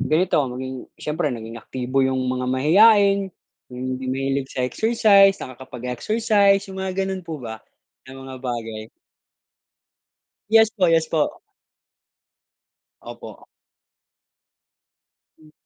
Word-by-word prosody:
ganito 165 +1 +2
maging 130 +1 -7
siyempre 150 0 -2
naging 115 -2 -7
aktibo 130 +3 -2
yung 130 -1 0
mga 125 0 -2
mahiyain, 195 - +4 0.4
yung 125 0 -7
hindi 130 0 -7
mahilig 135 +1 -2
sa 130 -2 -2
exercise, 200 - +4
nakakapag-exercise, 195 - 0
yung 190 - -6
mga 190 0 -2
gano'n 190 -1 -4
po 165 -2 -6
ba 110 -2 -7 0.5
na 130 - -10
mga 135 0 -9
bagay. 115 -3 -5 1.6
Yes 220 0 +6
po, 190 -5 +2
yes 165 -1 +2
po. 230 - -1 1.6
Opo. - - -11 2.0
M 155 -1 -19
135 Hz, 105 wpm, -22 LUFS, 125-195 Hz, 2.0 s, Yes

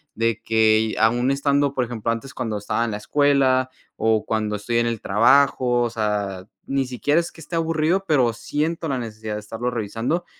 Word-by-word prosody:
de 115 0 0
que 110 0 +2
aún 120 +4 +3
estando, 140 0 +1
por 125 -2 0
ejemplo, 115 -1 -3
antes 115 +4 -5
cuando 110 -3 -3
estaba 105 +3 -1
en 115 - -2
la 105 - -3
escuela 135 0 +2 0.3
o 110 -1 +1
cuando 105 -1 -1
estoy 115 +3 -1
en 120 - +1
el 115 -2 -2
trabajo, 120 +2 +3
o 120 - 0
sea, 105 -4 -2 0.2
ni 135 -1 0
siquiera 145 +6 +1
es 170 - -7
que - - -17
esté 165 +2 -7
aburrido, 165 +3 +1
pero 130 -8 +2
siento 155 +7 -2
la 135 - -1
necesidad 110 -2 -6
de - - -3
estarlo 115 +4 -4
revisando 115 - -2
120 Hz, 190 wpm, -22 LUFS, 110-140 Hz, 0.3 s, aún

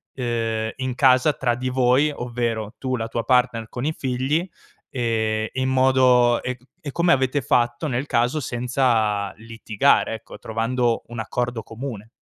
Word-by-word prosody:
uhm, 115 -3 -2
in 130 -1 -3
casa 130 +2 +4
tra 125 -3 0
di 130 +2 -3
voi, 130 +3 +3
ovvero 115 -3 -3
tu, 130 -1 -1
la 115 -2 -3
tua 115 0 -3
partner 125 -3 +1
con 125 +2 -5
i 155 - 0
figli, 135 +7 -1 0.4
ehm 110 -3 -1
in 130 0 -1
modo 130 -2 +4
e 125 0 -4
mhmm, 125 - -26 0.2
e - - -3
come 170 0 +2
avete 130 -1 +2
fatto, 120 +5 +1
nel 130 0 -2
caso, 125 +6 +1
senza 120 -6 0
litigare, 110 -1 +1
ecco, - - -12
trovando 115 +1 -1
un 120 0 -7
accordo 120 +1 -2
comune. 115 -1 -7
125 Hz, 155 wpm, -23 LUFS, 115-130 Hz, 0.4 s, casa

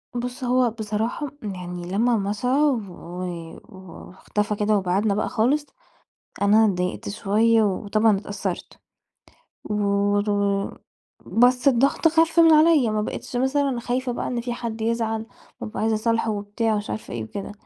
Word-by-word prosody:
بُصّ، 245 +1 -4
هو 250 0 +3
بصراحة 220 +6 -3 0.2
يعني 180 -3 -6
لما 230 +4 +2
مشَى 205 +4 -2
و 260 -6 +2 0.8
واختفى 190 +2 -5
كده 210 +1 +2
وبعِدنا 195 +2 +1
بقى 210 - -1
خالص، 270 +7 +1 0.8
أنا 210 +2 +5
اتضايقت 180 -3 -1
شوية 220 +3 +2
وطبعًا 210 +1 +2
اتأثّرت 195 -2 -5 0.9
و 210 - -4 0.6
و 200 -1 0 0.5
بس 245 +2 +3
الضغط 275 +5 +3
خَف 325 +1 +3
من 330 -1 +7
عليَّ، 310 -5 +5
ما 215 0 0
بقيتش 215 - -6
مثلًا 265 0 +1
خايفة 250 +1 -2
بقى 240 - -3
إن 245 -1 -2
في 240 0 -3
حَد 230 -2 -5
يزعَل 225 -1 -1 0.4
وأبقى 215 - -5
عايزة 220 0 +2
أصالحه 225 +1 0
وبتاع 210 +2 -1
مش 205 - -6
عارفة 215 - -5
إيه 115 -2 -4
وكده، 195 - -6
220 Hz, 140 wpm, -23 LUFS, 205-245 Hz, 0.9 s, من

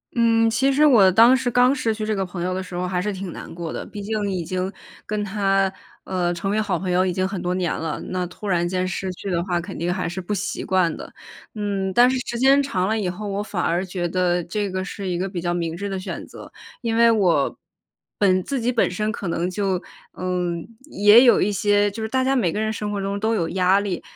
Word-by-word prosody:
嗯， 230 -1 +3
其 265 +5 +2
实 290 +3 +4
我 215 -10 +6
当 230 +7 +7
时 255 -1 -1
刚 250 +3 +4
失 230 -5 0
去 215 0 -4
这 215 0 -1
个 195 -1 -1
朋 180 -1 -7
友 180 +1 -1
的 190 +1 -3
时 185 - -12
候 180 +1 -2
还 180 -1 -1
是 210 +2 -2
挺 190 -2 -6
难 - - -9
过 165 -1 -5
的， - - -5
毕 205 - -8
竟 205 -1 -2
已 180 -3 -2
经 185 +2 -2 0.3
跟 210 0 -2
她， 195 -1 +1 0.3
呃， 175 -2 -1
成 175 +3 -3
为 215 +2 +1
好 195 -5 -1
朋 185 +1 -4
友 180 +1 +2
已 185 - 0
经 185 +1 0
很 190 -2 -5
多 180 0 -1
年 180 -2 -1
了， 160 -1 -3
那 185 -1 -2
突 180 +4 -9
然 175 -2 +1
间 185 +1 -1
失 185 0 -3
去 185 +2 -7
的 175 -2 0
话 175 -2 -1
肯 170 - -7
定 175 +2 -1
还 185 - -2
是 175 +3 -4
不 185 +4 -4
习 200 -1 -3
惯 185 -3 +1
的。 - - -10 0.4
嗯， 200 -2 -2
但 245 +4 +6
是 260 - 0
时 235 - -4
间 270 +2 +5
长 190 -9 -1
了 220 - 0
以 200 -4 -1
后， 205 +4 -6
我 200 +1 -2
反 195 -4 -3
而 175 +2 0
觉 180 -1 -3
得 180 0 +1
这 200 +3 -3
个 185 0 -2
是 195 0 -6
一 175 - -1
个 185 +2 -2
比 185 -3 -5
较 175 0 -1
明 165 -2 -2
智 200 +3 -4
的 195 -1 -3
选 185 - -6
择， - - -12 0.3
因 230 -1 -1
为 230 0 +6
我 180 -10 +2 0.6
本 185 -2 +3
自 275 -3 -3
己 240 +2 +1
本 240 - +2
身 210 +4 -2
可 205 -4 -5
能 170 +1 -1
就， 190 -1 -1 0.3
嗯， 180 -2 -2 0.2
也 210 +4 +6
有 240 - +5
一 205 - +2
些 205 0 +2
就 220 - -7
是 220 - -2
大 260 +3 0
家 265 +1 +2
每 220 -11 +1
个 210 - -1
人 220 0 0
生 210 -1 -4
活 200 - -2
中 200 +1 -2
都 220 +2 +1
有 170 -6 -1
压 190 +2 +3
力， 195 -4 -3
195 Hz, 280 characters per minute, -22 LUFS, 180-215 Hz, 0.6 s, 当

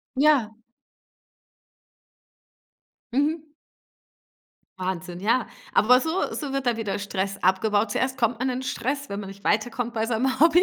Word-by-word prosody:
Ja. 265 -7 +3 2.6
Mhm. 300 +2 0 1.3
Wahnsinn, 180 -1 -4
ja. 230 +5 +1 0.3
Aber 250 +4 +6
so 320 +4 -1
so 285 -3 -4
wird 275 -1 -1
dann 235 -2 +1
wieder 210 -3 -2
Stress 200 0 -2
abgebaut. 205 +3 +2
Zuerst 260 +3 0
kommt 230 -2 +1
man 260 +1 0
in 255 +1 -2
Stress, 275 +3 -2
wenn 200 +1 -4
man 195 -1 -6
nicht 200 0 -12
weiterkommt 235 +3 0
bei 220 0 0
seinem 245 +4 0
Hobby. 335 +3 +6
235 Hz, 135 wpm, -25 LUFS, 205-270 Hz, 2.6 s, Aber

